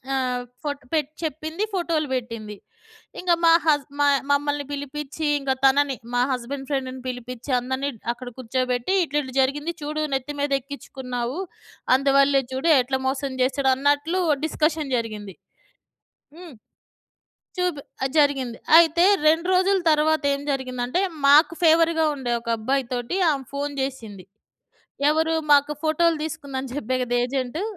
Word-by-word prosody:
ఆహ్, 255 -2 -1 0.2
ఫోట్ 290 -1 -4
పెట్ 305 -3 0
చెప్పింది 315 +5 -3
ఫోటోలు 335 -4 0
బెట్టింది. 230 -4 -5 0.6
ఇంగ 360 - -3
మా 330 - +7
హస్ 290 -3 +3
మాయ్ 285 -1 +4
మమ్మల్ని 290 0 +1
పిలిపిచ్చి 285 +2 -5
ఇంగ 275 -1 -1
తనని, 275 0 +3 0.2
మా 245 - +2
హస్బండ్ 265 +2 -4
ఫ్రెండ్‌ని 260 -2 -3
పిలిపిచ్చి 250 +1 -6
అందరినీ 260 +3 -2
డ్ - - -23
అక్కడ 250 +1 -9
కూర్చోబెట్టి 255 +5 -1
"ఇట్ల 295 -2 -5
ఇట్ల 260 -2 -9
జరిగింది 295 +5 0
చూడు 305 +1 -3
నెత్తి 270 +2 -3
మీదెక్కిచ్చుకున్నావు. 270 -2 -3 0.6
అందువల్లే 275 0 +3
చూడు 265 +6 0
ఎట్ల 265 +1 -1
మోసం 265 0 -2
జేసాడో" 265 +1 +1
అన్నట్లు 290 +6 +1 0.3
డిస్కషన్ 310 -3 0
జరిగింది. 210 -4 -6 1.0
హ్మ్. 345 -4 -11 1.0
చూబ్ 360 -4 0 0.3
ఆ! - - +2
జరిగింది. 275 -5 +1 0.2
అయితే 340 +1 +4 0.2
2 325 +2 +2
రోజుల 380 +2 +3
తరువాతేం 300 -2 +2
జరిగిందంటే 255 +2 -2 0.3
మాకు 300 +4 +6
ఫేవర్‌గా 325 0 +4
ఉండే 260 -4 -3
ఒక 235 - -11
అబ్బాయి 265 +4 0
తోటి 245 +8 -2
ఆమే 275 -2 -2
ఫోను 285 +1 -3
జెసింది. 225 -8 -5 0.8
ఎవరూ 320 +1 +2 0.2
మాకు 285 +1 +4
ఫోటోలు 325 +1 +2
దీసుకుందని 280 -5 -5
జెప్పా 260 -2 -2
గదా! 245 0 -1
ఏజెంటు 260 +6 -3
280 Hz, 130 wpm, -23 LUFS, 255-310 Hz, 1.0 s, మా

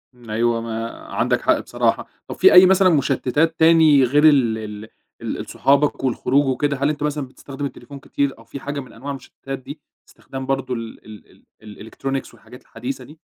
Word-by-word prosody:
امم، 120 -2 -16
أيوة 115 +1 +1
ما 115 0 -4 0.2
عندك - - 0
حق - - +2
بصراحة، - - -1 0.2
طَب - - -6
فيه - - +6
أي 180 +1 +10
مثلًا 190 0 +5
مشتِّتات 155 +1 +1
تاني 160 -4 +6
غير 145 +5 +2
ال 120 -6 +2
ال 105 0 -8 0.3
ال - - -5
صحابك 140 0 +1
والخروج 135 +2 +1
وكده؟ 140 +2 0
هل 140 +2 +1
أنت 150 -1 -3
مثلًا 150 -2 -2
بتستخدم 140 +2 -8
التليفون 140 0 -9
كتير 140 -1 -2
أو 115 - -16
في 140 - -8
حاجة 145 +1 -5
من 130 - -10
أنواع 140 +5 -7
المشتِّتات 135 0 -8
دي؟ 145 +3 -10 0.3
استخدام 135 0 -8
برضه 135 -1 -2
ال 115 -1 -7
ال 110 -1 -15 0.2
ال 105 +1 -11
الelectronics 135 0 -4
والحاجات 125 - -15
الحديثة 130 0 -7
دي؟ 150 +5 -15
135 Hz, 185 wpm, -21 LUFS, 120-145 Hz, 0.3 s, أي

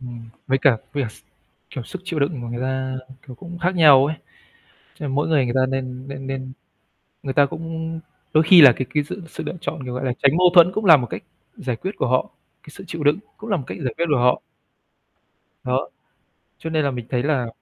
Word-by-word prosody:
Ừm, 120 -2 -9 0.2
với 135 - +2
cả 135 -2 +4 0.2
với 145 - -1
cả 120 - -3
s - - -17 0.5
kiểu, 130 - -6
sức 190 - -8
chịu 170 -4 -3
đựng 140 -1 -1
của 120 - -6
người 120 +1 -5
ta, 130 0 -2
ừ, 135 - -14
kiểu, 130 - -9
cũng 175 +7 -10
khác 180 +2 0
nhau 145 -5 +7
ấy. 155 - -3 0.8
Cho - - -7
nên 135 - -3
mỗi 145 - +1
người 150 -5 +2
người 120 - -2
ta 130 0 +3
nên 130 0 -4
nên 135 -1 -7
nên 130 -1 -5 0.7
người 135 - -3
ta 145 0 +5
cũng 165 +2 -5 0.3
đôi 155 - +5
khi 170 +1 +8
là 140 -4 +10
cái 130 +2 -3
cái 150 -1 +2
sự 180 +6 -8
sự - - -7
lựa - - -4
chọn, 140 - -4
kiểu, 125 -1 -5
gọi 125 +2 -3
là, 130 - 0
tránh 140 +3 +4
mâu 180 0 +6
thuẫn 175 0 +7
cũng 215 0 -2
là 160 -4 +9
một 125 -3 -3
cách - - -6 0.3
giải 125 -3 -3
quyết 185 +12 -4
của - - 0
họ, 130 +1 +1 0.3
cái - - -14
sự - - -12
chịu 165 -2 -5
đựng 145 +5 +3 0.2
cũng 220 +1 -9
là 195 - +2
một 140 - -5
cách - - -6
giải 125 -3 -2
quyết 170 - +1
của - - +3
họ. 125 +1 +3 1.2
Đó, - - -1 0.7
cho 160 - -6
nên 155 -2 +1
là 140 - +1
mình 120 -3 -6
thấy 125 -2 0
là 140 -4 0
140 Hz, 250 wpm, -22 LUFS, 130-160 Hz, 1.2 s, là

